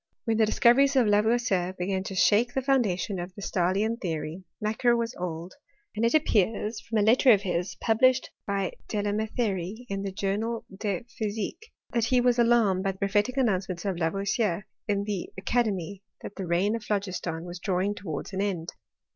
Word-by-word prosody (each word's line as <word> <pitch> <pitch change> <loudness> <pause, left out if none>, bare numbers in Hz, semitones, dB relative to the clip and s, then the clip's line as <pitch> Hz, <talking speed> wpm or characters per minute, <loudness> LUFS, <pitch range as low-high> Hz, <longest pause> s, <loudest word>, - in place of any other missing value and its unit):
When 225 -1 +1
the 220 -1 +4
discoveries 270 +6 +4
of 255 -3 +5
Lavoisier 210 -3 +2
began 190 +1 -1
to 195 - -5
shake 220 +6 +3
the 265 - 0
foun 270 -1 +4
dation 185 -2 -2
of 180 +1 -8
the 200 - -8
Stahlian 195 +7 0
theory, 165 0 -3 0.2
Macquer 235 +3 +2
was 230 +1 -2
old; 175 -1 -5 0.4
and 215 - -1
It 230 +5 +3
appears 215 - +1
from 225 - -3
a 210 - +3
letter 245 +4 +6
of 205 -3 +4
his, 180 -1 -2
published 245 +3 +2 0.2
by 195 -2 -1 0.2
Dela 205 -1 -1
Qketherie 215 -1 -2
in 195 0 -2
the 195 -1 -3
Journal 210 +4 -2
de 200 0 -3
Physique, 220 - -4 0.2
that 235 -2 +2
he 250 +2 +3
was 245 0 +3
alarmed 220 -5 +3
at 195 - 0
the - - -19
prophetic 205 +6 0
announcements 190 -8 0
of 190 -3 -1
Lavoisier 195 +2 0 0.2
in 200 -1 +1
the 200 -3 -3
academy 200 -3 -1 0.2
that - - -7
the 190 -3 -5
reign 185 +6 +2
of 230 - -5
Phlogiston 185 -5 -2
was 175 0 -7
drawing 190 +1 0
towards 185 -3 -6
an 190 - -1
end. 180 -5 -2
205 Hz, 180 wpm, -27 LUFS, 185-230 Hz, 0.4 s, letter